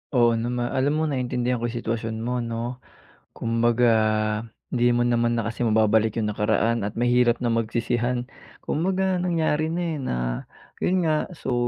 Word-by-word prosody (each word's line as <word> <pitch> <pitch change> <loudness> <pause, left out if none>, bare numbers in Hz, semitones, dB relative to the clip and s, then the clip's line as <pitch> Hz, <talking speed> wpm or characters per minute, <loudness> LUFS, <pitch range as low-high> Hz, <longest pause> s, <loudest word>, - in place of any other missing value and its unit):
Oo, 120 -1 +4
nama 120 +1 -1
alam 135 +2 +2
mo - - +1
naintindihan 125 -2 -1
ko 120 0 -2
yung 120 - -4
sitwasyon 110 -1 -3
mo 120 +1 -2
'no. 115 +2 -4 0.5
Kumbaga 115 +1 +1 0.9
hindi 120 0 +3
mo 120 0 +2
naman 120 0 +1
na 115 - -1
kasi 115 +2 -3
mababalik 110 0 +3
yung 110 - 0
nakaraan 110 +2 +1
at 105 +3 -4
mahirap 120 0 +3
na 125 - -2
magsisihan 120 +2 0 0.3
kumbaga 185 +2 0
nangyari 160 -3 +1
na, 170 +2 -2
eh, 160 - -2
na 130 - -2 0.7
yun 180 -2 +2
nga 155 +3 0
so, 150 -7 -4
120 Hz, 160 wpm, -24 LUFS, 115-130 Hz, 0.9 s, Oo